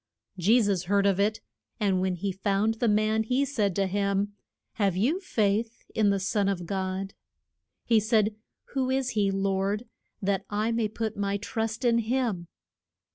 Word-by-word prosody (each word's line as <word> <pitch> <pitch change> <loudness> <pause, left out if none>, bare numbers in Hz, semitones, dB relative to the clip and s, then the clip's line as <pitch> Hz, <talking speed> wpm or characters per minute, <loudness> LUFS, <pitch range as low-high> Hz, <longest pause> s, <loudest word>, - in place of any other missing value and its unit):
Je 200 +7 +4
sus 200 -5 +1
heard 200 +2 +2
of 195 -1 +3
it, 210 +2 +1 0.4
and 195 -4 +2
when 185 -1 0
he 195 +3 -2
found 195 +3 +1
the 240 - +2
man 215 +1 +2
he 250 +5 +1
said 210 -9 0
to 195 - +2
him, 200 +1 0 0.5
Have 195 -4 +2
you 270 - +2
faith 225 - 0
in 215 -2 +3
the 200 0 +2
son 200 +1 +1
of 180 -3 -2
God? 190 +1 -3 0.7
He 230 -2 +4
said, 215 0 +2 0.4
Who 265 -2 0
is 260 -1 0
he, 205 -2 +1
Lord, 195 +3 0 0.3
that 195 -1 0
I 215 +2 0
may 230 -1 +1
put 220 +1 -3
my 200 0 -1
trust 225 +3 -3
in 235 -1 +4
him? 225 -6 -1
205 Hz, 170 wpm, -27 LUFS, 195-225 Hz, 0.7 s, Je